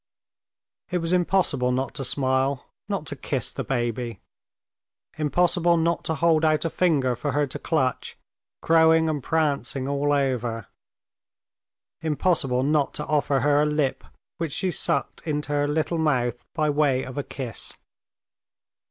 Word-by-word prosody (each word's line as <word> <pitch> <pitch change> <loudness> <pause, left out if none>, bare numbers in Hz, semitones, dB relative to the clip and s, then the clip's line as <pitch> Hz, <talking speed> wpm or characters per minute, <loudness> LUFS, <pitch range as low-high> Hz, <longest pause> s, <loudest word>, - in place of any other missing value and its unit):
It 180 - 0
was 165 0 -1
impossible 175 -8 +2
not 130 +1 -1
to 135 - -4
smile, 130 +1 +1 0.2
not - - -2
to - - -5
kiss - - -2
the - - -3
baby, 120 -2 -2 1.0
impossible 170 +2 +2
not 165 +1 0
to 160 - -1
hold 160 +1 +3
out 155 0 +2
a 165 - -1
finger 140 -9 +2
for 140 +4 -3
her 145 0 +2
to 130 - -6
clutch, 135 -6 -1 0.5
crowing 160 0 +5
and 155 -3 -1
prancing 140 -3 0
all 140 +1 0
over; 125 -6 0 1.4
impossible 150 -5 +1
not 145 0 +1
to - - -3
offer 145 -3 +1
her 145 +2 +3
a - - +3
lip 150 -3 0 0.4
which 165 -4 -2
she 185 - -1
sucked - - -1
into 150 -2 -3
her 145 0 +1
little 160 +3 -1
mouth 125 -6 0
by 155 -2 +1
way 145 -3 +2
of 130 -1 -8
a - - -2
kiss. 130 -6 -6
145 Hz, 145 wpm, -25 LUFS, 130-160 Hz, 1.4 s, crowing